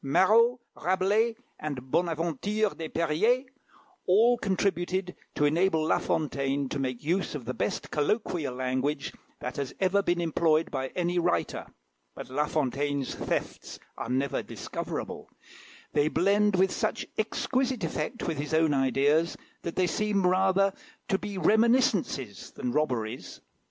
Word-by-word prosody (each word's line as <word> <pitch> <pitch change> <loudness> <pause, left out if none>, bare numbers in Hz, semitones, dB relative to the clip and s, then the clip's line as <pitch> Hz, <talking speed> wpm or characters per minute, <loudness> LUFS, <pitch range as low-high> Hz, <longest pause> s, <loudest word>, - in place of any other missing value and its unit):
Marot, 225 - +4 0.2
Rabelais, 200 +6 +1 0.2
and 130 -4 -5
Bonaventure 170 +5 0
des 160 -1 -5
Periers, 175 - +2 0.6
all 225 +6 +5
contributed 185 -2 -1 0.2
to 145 - +2
enable 160 +1 +2
La - - +3
Fontaine 140 -2 -1
to 140 - -3
make 130 -2 -3
use 175 +2 0
of 130 -5 -6
the 125 - -3
best - - -3
colloquial 155 - 0
language 130 +3 -1 0.3
that 125 - -5
has 140 -2 -4
ever 195 +1 +3
been 175 -3 0
employed 165 -1 +2
by 130 -2 -2
any 175 0 +1
writer; 85 - 0 0.5
but - - -8
La 150 +3 +1
Fontaine's 145 -1 -1
thefts - - -3 0.2
are - - -5
never 130 +1 0
discoverable; - - -6 0.6
they 145 0 +3
blend 200 +5 +3
with 190 +1 +3
such - - -1
exquisite 260 -2 0
effect 240 - -3
with 160 -4 -2
his 150 +2 -1
own 160 -2 +3
ideas, 140 +5 +2 0.2
that 170 - -5
they 185 - +3
seem 200 +2 0
rather 190 +1 +3 0.3
to 195 -3 +1
be 205 -2 -5
reminiscences 205 - +2
than 125 - -4
robberies. 125 -5 -2
165 Hz, 135 wpm, -28 LUFS, 140-195 Hz, 0.6 s, all